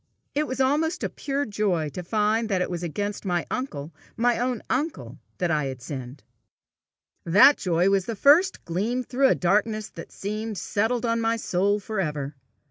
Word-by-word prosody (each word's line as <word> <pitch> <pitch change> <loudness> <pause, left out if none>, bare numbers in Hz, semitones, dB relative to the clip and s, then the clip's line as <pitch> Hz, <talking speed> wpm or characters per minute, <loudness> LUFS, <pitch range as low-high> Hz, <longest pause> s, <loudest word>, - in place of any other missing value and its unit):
It 300 +1 0
was 260 - -4
almost 310 +6 +1
a - - 0
pure 280 0 -2
joy 195 -7 0
to 180 - -6
find 215 +4 0
that 190 -3 +1
it 180 - -1
was 175 -1 -3
against 205 +5 -3
my 175 -4 -1
uncle, 165 - -4 0.2
my 240 0 +2
own 245 -2 -1
uncle, 300 +5 -3 0.2
that 175 -2 0
I 150 -3 +1
had 130 -1 -5
sinned! 130 +1 -7 1.0
That 205 - +7
joy 175 0 +1
was 195 -2 +2
the 230 - -3
first 310 - +4
gleam 215 +9 -1
through 265 +3 +2
a - - +3
darkness 210 +4 +1
that 165 - -9
had - - -29
seemed 215 +1 -4
settled 225 +6 0
on 230 0 +1
my 225 0 +1
soul 205 -2 +1
for 215 +1 -4
ever. 150 -5 -2
210 Hz, 185 wpm, -25 LUFS, 175-245 Hz, 1.0 s, That